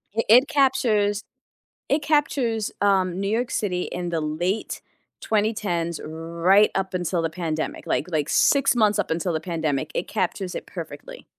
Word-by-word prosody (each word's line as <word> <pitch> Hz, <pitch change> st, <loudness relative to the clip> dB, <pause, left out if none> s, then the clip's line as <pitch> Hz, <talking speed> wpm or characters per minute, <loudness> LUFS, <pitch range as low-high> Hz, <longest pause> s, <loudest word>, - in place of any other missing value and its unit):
I 225 Hz, -, +2 dB
it 250 Hz, +5 st, +7 dB
captures 220 Hz, -7 st, +2 dB, 0.7 s
it 290 Hz, +2 st, +2 dB
captures, 275 Hz, -7 st, 0 dB
um, 190 Hz, -3 st, +2 dB
New 195 Hz, 0 st, -1 dB
York 230 Hz, +3 st, -1 dB
City 180 Hz, -4 st, -1 dB
in 175 Hz, 0 st, -4 dB
the 165 Hz, -2 st, -1 dB
late 175 Hz, +7 st, -2 dB, 0.4 s
2010's 205 Hz, -6 st, -1 dB
right 170 Hz, +6 st, +2 dB
up 190 Hz, -1 st, -2 dB
until 175 Hz, -1 st, -1 dB
the 165 Hz, -, -1 dB
pandemic, 160 Hz, -2 st, -4 dB
like 155 Hz, -, 0 dB
like, 155 Hz, -2 st, -1 dB
6 275 Hz, -2 st, +3 dB
months 215 Hz, -3 st, +3 dB
up 205 Hz, -, -1 dB
until 170 Hz, +2 st, -1 dB
the 160 Hz, -, 0 dB
pandemic, 155 Hz, -4 st, -2 dB
it -, -, -2 dB
captures 185 Hz, 0 st, -2 dB
it -, -, -5 dB
perfectly. -, -, -9 dB
190 Hz, 160 wpm, -24 LUFS, 170-220 Hz, 0.7 s, it